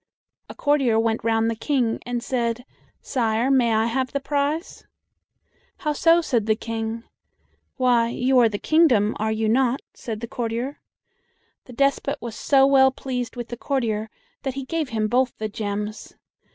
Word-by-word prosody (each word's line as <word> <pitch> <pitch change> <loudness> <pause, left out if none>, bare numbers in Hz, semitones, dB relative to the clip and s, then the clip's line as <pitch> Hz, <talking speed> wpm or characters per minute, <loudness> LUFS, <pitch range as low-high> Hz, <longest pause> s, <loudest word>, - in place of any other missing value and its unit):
A - - -9
courtier 275 -6 +2
went 225 0 0
round 225 0 +2
the 230 - -1
King, 240 -1 0
and 240 -1 -2
said, 240 -1 -2 0.4
"Sire, 235 0 0
may 250 -4 +3
I 220 0 +2
have 255 +2 -1
the 280 - 0
prize?" 290 +4 -2 0.9
"How 300 - -1
so?" 330 +3 +4
said 235 -9 0
the 215 - +3
King. 225 0 -4 0.7
"Why, 245 -3 +3
you 255 +2 +2
are 235 -2 +5
the 205 - -3
kingdom, 250 -8 +3
are 220 +1 0
you 220 0 0
not?" 255 +3 +2
said 220 -3 -6
the 235 - -4
courtier. 235 +4 -3 0.9
The 250 - -12
despot 275 +2 +1
was 235 -2 -7
so 270 +4 +4
well 270 -1 +6
pleased 255 -2 -5
with 240 -1 -6
the 240 - -6
courtier 225 -6 -1 0.3
that 265 -1 -4
he 275 -1 -5
gave 315 0 -2
him 220 -1 0
both 250 +2 +1
the 215 - -3
gems. 210 0 -5
240 Hz, 165 wpm, -23 LUFS, 225-270 Hz, 0.9 s, well